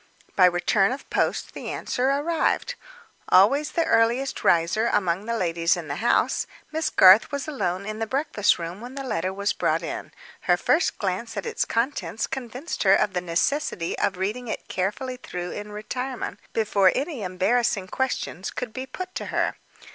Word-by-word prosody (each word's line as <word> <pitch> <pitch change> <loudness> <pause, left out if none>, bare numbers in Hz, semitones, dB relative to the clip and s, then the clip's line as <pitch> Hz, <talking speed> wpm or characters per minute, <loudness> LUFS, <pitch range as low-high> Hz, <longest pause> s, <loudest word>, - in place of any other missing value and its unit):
By 185 - +6
return 185 +3 +2
of 270 - -6
post - - 0
the - - -6
answer 255 +2 -1
arrived. 320 - 0 0.6
Always 275 +11 +4
the 335 -2 +1
earliest 235 +4 +2
riser 170 +7 +3
among 190 -1 0
the 230 0 -1
ladies 170 -1 +1
of 170 -3 -6
the 140 0 -3
house, 235 - +1 0.2
Miss 320 +1 0
Garth 190 +7 +7
was 280 0 -3
alone 195 -10 -2
in 215 +1 -5
the 225 - -2
breakfast 260 -6 +1
room 170 +4 -6
when 250 +2 -9
the 275 - -4
letter 190 -7 -1
was 200 +1 -1
brought - - 0
in. - - -5 0.4
Her - - +6
first 340 - +1
glance 205 +4 -3
at 200 - -3
its - - -1
contents 230 -1 -1
convinced 255 +5 -5
her 195 -1 +6
of 200 - +1
the 180 - -1
necessity 180 - -1
of 190 - 0
reading 215 +7 -3
it - - -5
carefully 250 +8 -2
through 180 -7 -6
in 210 0 -7
retirement, 250 +5 -5
before 205 -4 +3
any 280 -2 -2
embarrassing 195 +3 +1
questions 250 -5 -2
could 240 -3 -5
be 260 0 -5
put 370 +7 -7
to - - -4
her. - - 0
220 Hz, 175 wpm, -25 LUFS, 185-260 Hz, 0.6 s, Garth